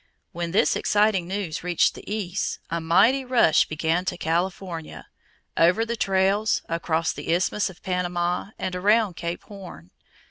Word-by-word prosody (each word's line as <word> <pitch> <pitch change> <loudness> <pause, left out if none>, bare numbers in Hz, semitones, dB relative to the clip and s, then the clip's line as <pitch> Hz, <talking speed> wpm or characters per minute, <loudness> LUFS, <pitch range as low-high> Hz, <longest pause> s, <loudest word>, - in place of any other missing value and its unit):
When 170 0 -4
this 210 +7 +2
exciting 205 -4 +2
news 185 -4 -4
reached 175 -1 +2
the - - -10
East, 200 -3 -2
a 170 0 -1
mighty 225 +12 +4
rush 245 -11 +4
began 160 +3 0
to 180 - -2
California, 175 0 -3 0.5
over 180 +7 +3
the 235 +1 -3
trails, 195 +1 +1
across 165 -1 -1
the - - -4
Isthmus 185 +4 +1
of 185 - -15
Panama, 180 0 -1
and 185 - -3
around 205 +1 +2
Cape 170 +1 -5
Horn. 185 - -11
180 Hz, 145 wpm, -24 LUFS, 170-205 Hz, 0.5 s, mighty